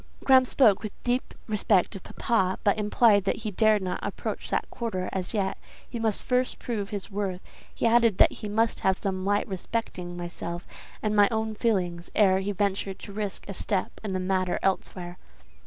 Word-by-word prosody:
"Graham 260 -1 +6
spoke 220 -6 +4
with 215 -2 -5
deep 245 +1 -1
respect 210 -3 +2
of 195 - -7
papa, 190 -5 0
but 205 +1 +3
implied 210 -1 +4
that - - +1
he 215 - -1
dared 215 0 +3
not 180 -1 -2
approach - - -4
that - - 0
quarter 185 -6 -3
as 185 -1 -3
yet; 195 -1 -1 0.3
he 240 - -5
must 220 -2 0
first 250 0 0
prove 210 -5 -3
his 205 +1 -5
worth: 195 -2 -2 0.3
he - - -3
added 230 -3 +4
that - - +6
he 210 - -6
must 225 +2 +1
have 190 0 +2
some 185 -1 -2
light 205 +1 +1
respecting 185 -3 -4
myself 175 0 -5 0.4
and 215 -1 +1
my 205 -1 +6
own 220 -1 -1
feelings 180 -6 -1
ere 190 -3 +5
he 195 +1 -2
ventured 195 -1 -1
to 200 - -10
risk 205 -1 -4
a 200 - -5
step 195 0 -2
in 205 -3 -3
the 185 - 0
matter 185 -1 0
elsewhere." 180 -2 -2
200 Hz, 190 wpm, -27 LUFS, 185-220 Hz, 0.4 s, Graham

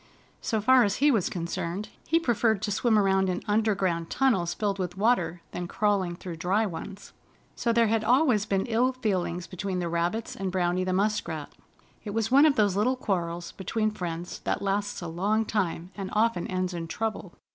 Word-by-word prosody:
So 220 - 0
far 255 +3 +6
as 205 0 +1
he 290 +2 +4
was 215 -8 +1
concerned, 175 +3 -4 0.2
he 330 - +3
preferred 225 - +1
to 210 - -1
swim 220 +2 +2
around 190 -2 +3
in 180 0 -2
underground 195 -6 +1
tunnels 195 -11 +2
filled 200 -2 -1
with 180 -1 -3
water 185 -6 +1
than 175 - -4
crawling 195 -3 0
through 170 -1 -7
dry 195 +7 +1
ones. 195 +2 -7 0.4
So 235 - 0
there 230 0 +4
had 225 0 +1
always 240 -3 +3
been 195 -1 0
ill 245 +2 +2
feeling 185 -8 -1
between 190 0 -4
the 175 -1 -1
rabbits 170 +7 -1
and 195 -1 -3
Browny 180 0 +1
the 185 - -1
Muskrat. 185 -6 -1 0.5
It 210 -1 -5
was 225 0 0
one 280 +4 +7
of 290 - +3
those 205 -3 +2
little 230 +6 +2
quarrels 175 -7 -2
between 215 +3 -1
friends 175 -3 -5
that - - -2
lasts 200 -1 -1
a - - -4
long 205 +7 0
time, 185 -4 -2
and 195 -2 -5
often 215 -4 +1
ends 185 0 -2
in 165 -1 -4
trouble. 215 -1 -4
195 Hz, 190 wpm, -27 LUFS, 180-220 Hz, 0.5 s, one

